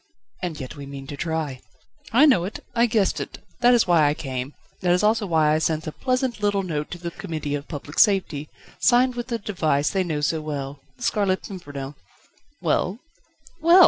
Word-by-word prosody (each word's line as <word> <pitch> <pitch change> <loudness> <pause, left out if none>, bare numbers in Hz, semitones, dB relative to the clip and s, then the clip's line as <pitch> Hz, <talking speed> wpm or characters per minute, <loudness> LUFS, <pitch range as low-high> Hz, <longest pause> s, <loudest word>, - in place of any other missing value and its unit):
"And 175 -5 -3
yet 130 -2 -6
we 140 -1 -8
mean 140 -1 -7
to 145 - -6
try." 155 -4 -2 0.5
"I 260 +7 +7
know 255 - +5
it. 195 +4 -6
I 235 0 +4
guessed 215 -4 +2
it, - - -6 0.2
that 245 0 +6
is 235 - +4
why 165 -4 +5
I 145 - +1
came: 130 -1 -4 0.3
that 175 -1 +3
is 180 - +2
also 215 0 +3
why 155 -3 +3
I 155 - +3
sent 160 0 0
a 155 - -3
pleasant 255 - -1
little 205 -1 +2
note 150 -5 -3
to - - -6
the 170 0 -5
Committee 155 -3 -4
of 145 0 -3
Public 145 -1 -5
Safety, 185 -9 +3 0.3
signed 250 +1 +4
with 240 -1 -4
the 235 -2 -1
device 160 -9 0
they 190 -1 +1
know 155 -4 -2
so 155 +2 +1
well: 145 -2 -4 0.2
The 245 - -9
Scarlet 200 -5 +1
Pimpernel." 145 -7 -7 0.7
"Well?" 185 +4 +1 0.6
"Well! 340 +3 +7
170 Hz, 200 wpm, -24 LUFS, 150-210 Hz, 0.7 s, I